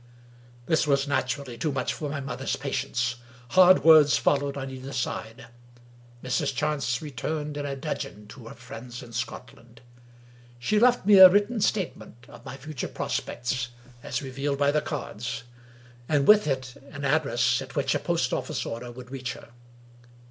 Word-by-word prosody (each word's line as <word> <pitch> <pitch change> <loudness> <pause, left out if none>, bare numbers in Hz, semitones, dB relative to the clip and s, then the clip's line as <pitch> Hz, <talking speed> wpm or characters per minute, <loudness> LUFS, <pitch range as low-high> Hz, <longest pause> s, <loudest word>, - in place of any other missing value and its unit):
" 120 0 -25
This 160 +1 +1
was, 140 -1 +2
naturally, 130 -3 -2
too 155 - 0
much 140 - -1
for 150 - -5
my 145 0 -3
mother's 140 0 -3
patience; 120 -1 -2 0.3
hard 185 +3 +6
words 155 -3 +7
followed 140 -1 +1
on 135 -1 -5
either 130 +1 -8
side; 120 -1 -4 0.8
Mrs. 125 +1 -1
Chance 140 -3 -1
returned 150 +1 -4
in 140 -2 -4
dudgeon 105 -8 -5
to 115 0 -11
her - - -10
friends 120 +2 -9
in 115 -1 -13
Scotland. 120 0 -7 0.8
She 210 - +1
left 245 -2 +4
me 205 -1 +7
a 185 -1 +12
written 205 +4 +1
statement 185 - -2
of 120 0 -14
my 135 +1 -8
future 140 0 -5
prospects, 125 0 -3 0.3
as 125 +4 -4
revealed 140 +2 -3
by 140 0 +3
the 150 +1 +1
cards, 115 -6 -5 0.7
and 145 -2 +2
with 210 -3 +7
it 130 -3 -3
an 145 -1 -5
address 140 -4 +2
at - - -10
which - - +1
a - - 0
post - - -1
office - - -2
order 120 +1 -6
would 125 +1 -11
reach 130 -3 -4
her. - - -13
140 Hz, 165 wpm, -26 LUFS, 125-150 Hz, 0.8 s, a